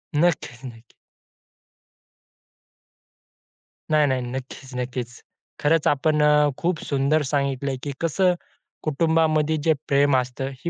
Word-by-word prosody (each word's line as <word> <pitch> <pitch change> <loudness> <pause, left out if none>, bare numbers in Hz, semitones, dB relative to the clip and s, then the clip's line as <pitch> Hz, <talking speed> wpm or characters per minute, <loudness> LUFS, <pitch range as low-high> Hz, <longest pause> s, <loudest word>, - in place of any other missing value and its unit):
नक्कीच-नक्कीच. 130 -7 -2 3.0
नाही-नाही. 145 -4 +3
नक्कीच-नक्कीच. 125 -1 -6 0.4
खरंच 155 +1 +2
आपण 150 +1 +2
अ, 150 0 +4
खूप 175 -1 -1
सुंदर 140 +2 +1
सांगितलय, 140 -1 -1
की 145 - -3
कसं 180 +3 +2 0.5
कुटुंबामध्ये 160 0 +2
जे 160 0 +4
प्रेम 140 0 +3
असतं 130 +1 -3
ही 170 - -4
145 Hz, 90 wpm, -23 LUFS, 130-155 Hz, 3.0 s, अ